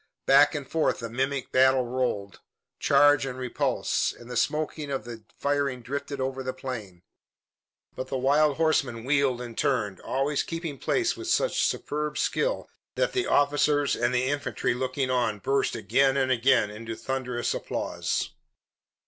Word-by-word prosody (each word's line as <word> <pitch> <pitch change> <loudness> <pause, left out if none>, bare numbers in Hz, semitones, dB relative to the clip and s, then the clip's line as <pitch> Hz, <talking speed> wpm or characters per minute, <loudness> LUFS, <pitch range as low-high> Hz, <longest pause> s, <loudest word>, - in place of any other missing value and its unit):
Back 145 +3 +6
and 145 -2 -4
forth 160 -1 +1
the 115 -2 -6
mimic 135 +2 -2
battle 130 0 +4
rolled, 120 -6 -2 0.4
charge 145 -1 +5
and 130 -2 -4
repulse, 125 -2 0
and 120 +1 -13
the - - -4
smoke 150 +5 0
of 140 -5 -3
the 115 -2 -9
firing 140 -3 -1
drifted 140 +2 -4
over 130 0 -2
the 130 0 -4
plain. 110 -9 -7 0.9
But 130 - -5
the 135 - -2
wild 145 +2 +3
horsemen 140 -8 +1
wheeled 135 -2 +1
and 120 -2 -7
turned, 115 -9 0
always 140 +2 0
keeping 165 -4 -5
place 350 -3 +1
with 350 - -7
such 475 +8 +2
superb 150 0 -2
skill - - 0 0.3
that - - 0
the 380 -1 0
officers 145 0 +2
and 120 +1 +1
the 125 0 +1
infantry 130 -5 -1
looking 130 +1 -2
on 120 -4 +1
burst 135 +6 0
again 135 0 +2
and 130 -1 +1
again 115 -4 +3
into 115 +1 -6
thunderous 125 -2 -2
applause. - - -2
130 Hz, 155 wpm, -27 LUFS, 125-145 Hz, 0.9 s, Back